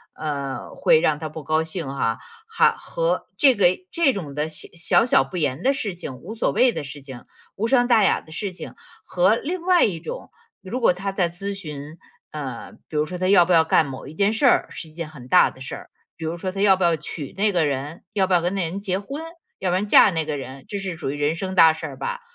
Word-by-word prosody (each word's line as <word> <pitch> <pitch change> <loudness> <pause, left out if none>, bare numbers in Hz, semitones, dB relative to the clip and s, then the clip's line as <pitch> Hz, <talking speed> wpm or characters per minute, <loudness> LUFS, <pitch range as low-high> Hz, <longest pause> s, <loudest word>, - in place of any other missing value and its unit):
呃， 140 -4 -4
会 155 - +4
让 155 -2 +1
他 155 0 -5
不 155 0 -8
高 155 +2 +1
兴 160 -2 -5
哈。 135 -4 -1 0.3
还 450 - +3
和 - - -2
这 270 -3 +6
个 195 -4 +5 0.2
这 330 -6 +2
种 160 -9 -6
的 150 +1 -1
小 165 +6 +1
小 245 - +4
不 185 - -7
言 145 -2 -1
的 270 +2 +3
事 220 -9 -3
情， 150 -7 -7
无 180 - -9
所 230 - 0
谓 250 0 +4
的 - - -4
事 145 0 -9
情， 130 -3 -10 0.3
无 225 +3 -1
伤 245 -1 +3
大 225 -4 +5
雅 - - +3
的 155 - -17
事 195 +3 -4
情， 180 - -9 0.3
和 185 +4 +2
另 340 +9 -4
外 360 -1 +4
一 180 -6 -2
种 - - -8 0.3
如 230 +7 -4
果 - - +5
他 195 +2 -4
在 185 -3 0
咨 195 +4 -5
询， 150 -4 -8 0.3
呃， 135 -6 -6 0.2
比 155 - -10
如 150 - +2
说 180 +3 -6
他 185 - 0
要 180 -4 +6
不 180 - -2
要 165 -1 +6
干 160 0 +3
某 135 -1 -8
一 - - -10
件 200 +3 +2
事 225 +5 +1
儿， - - +4
是 160 - -8
一 - - -18
件 165 -1 -5
很 130 -5 -12
大 180 - +5
的 130 - -17
事 135 - -6
儿。 - - -12 0.3
比 160 - -6
如 165 +2 -3
说 185 - -3
他 195 - -4
要 195 -2 +5
不 185 - -1
要 170 -1 +4
娶 150 -2 -6
那 210 +1 +2
个 175 -3 +2
人， 145 +4 -4
要 195 -2 +2
不 190 - -1
要 175 - +4
跟 175 +3 -1
那 195 - 0
个 165 - -2
人 195 - -4
结 190 -2 -2
婚， 275 +9 -7 0.4
要 185 - -1
不 175 - +1
要 185 - +1
嫁 205 -1 +6
那 160 -2 -1
个 150 -2 -3
人， 135 0 -8
这 205 - -3
是 190 -3 -4
属 160 -5 -4
于 145 - -5
人 145 +2 0
生 190 +2 -4
大 160 -3 +7
事 160 - -6
儿 - - -10
吧。 485 +1 -4
175 Hz, 280 characters per minute, -23 LUFS, 150-200 Hz, 0.4 s, 大